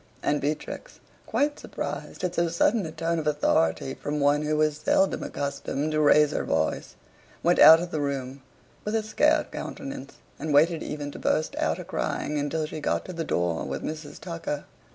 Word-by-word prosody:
And 145 0 +1
Beatrix, 155 - -4 0.3
quite 290 +1 0
surprised - - -6
at 180 -1 0
so 170 -1 +1
sudden 175 +4 +2
a - - -7
tone 165 +1 -1
of 155 - -3
authority 135 - +1
from 150 +2 -3
one 145 +1 +3
who 150 0 0
was 155 -1 +2
seldom 195 +5 +2
accustomed 140 +1 -3
to 155 0 +1
raise 150 0 +5
her - - -1
voice, 80 0 -1 0.5
went 175 +1 +3
out 160 +1 +10
of 175 +1 -5
the 155 - -1
room 135 -1 -3 0.4
with 210 +1 -2
a 220 - +1
scared 215 - +2
countenance, 275 - -7 0.2
and 150 0 -1
waited 160 +2 +4
even 145 -1 -5
to - - -9
burst 155 - 0
out - - 0
a - - -6
crying 150 0 -2
until 155 +2 -1
she 155 - -6
got 150 - -1
to 185 - -7
the 165 -1 -3
door 85 - 0
with 70 0 -4
Mrs. 155 -1 -6
Tucker. 165 -4 -4
150 Hz, 190 wpm, -26 LUFS, 145-165 Hz, 0.5 s, out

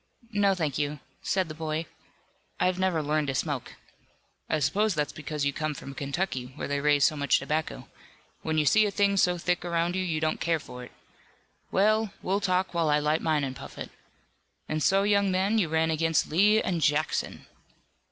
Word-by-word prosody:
"No, 200 -2 +2
thank 155 -6 -2
you," 145 0 -2 0.2
said 190 -2 0
the 155 - -7
boy, 155 +1 -3 0.7
"I've 185 0 +1
never 185 -4 +1
learned 150 0 0
to 135 - -2
smoke." - - -3 0.7
"I - - +2
suppose 190 +8 +1
that's 150 -1 -1
because 150 -1 -4
you 140 - +1
come 155 0 -2
from 140 - -8
Kentucky, 140 -2 -3
where - - -4
they 145 0 -1
raise 145 -1 +3
so 155 - +2
much 140 -1 +2
tobacco. 155 +1 -3 0.5
When 160 0 -2
you 150 - +3
see 215 +7 +5
a - - 0
thing 200 0 +2
so 180 -2 +3
thick 175 0 -1
around 170 0 0
you, 190 - 0
you 165 -4 -1
don't 155 0 -1
care 165 -1 +1
for 125 -3 -10
it. 125 - -11 0.8
Well, 215 +1 +2
we'll 195 +2 0
talk 185 -1 0
while 165 -2 +1
I 150 - +4
light 150 +2 +1
mine 155 -2 +1
and 130 -1 -3
puff - - -10
it. - - -7 0.8
And 155 0 -2
so, 195 +5 +3
young 200 -1 +3
man, 195 +4 +1
you 175 -6 +1
ran 160 0 +1
against 160 -1 +1
Lee 205 +6 +5
and 175 -3 -1
Jackson!" 150 +1 0
160 Hz, 195 wpm, -27 LUFS, 150-190 Hz, 0.8 s, see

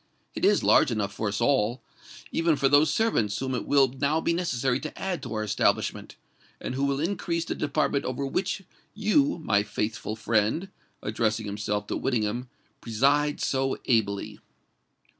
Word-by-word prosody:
It - - -6
is - - +4
large - - +5
enough 100 -3 -2
for 105 +1 -2
us 100 0 -2
all—even 140 +6 -1
for 140 - +2
those 145 +2 +5
servants 115 - +1
whom 130 0 -2
it 125 - -3
will 140 -2 +5
now 140 +5 0
be 170 - 0
necessary 130 -7 0
to 155 - -7
add 185 -5 -2
to - - -6
our 110 - -1
establishment, 105 - 0 0.4
and - - -4
who 135 +2 0
will 140 0 0
increase 170 0 -1
the - - -2
department 140 -1 0
over 130 +2 -2
which 190 +7 -2 0.3
you, 215 +7 +2
my 100 -7 +3
faithful 105 +1 -3
friend,"—addressing 110 - -1
himself 105 0 -2
to - - -3
Whittingham,—"preside 125 +4 -1
so 135 0 0
ably." 100 -5 0
130 Hz, 150 wpm, -27 LUFS, 110-150 Hz, 0.4 s, large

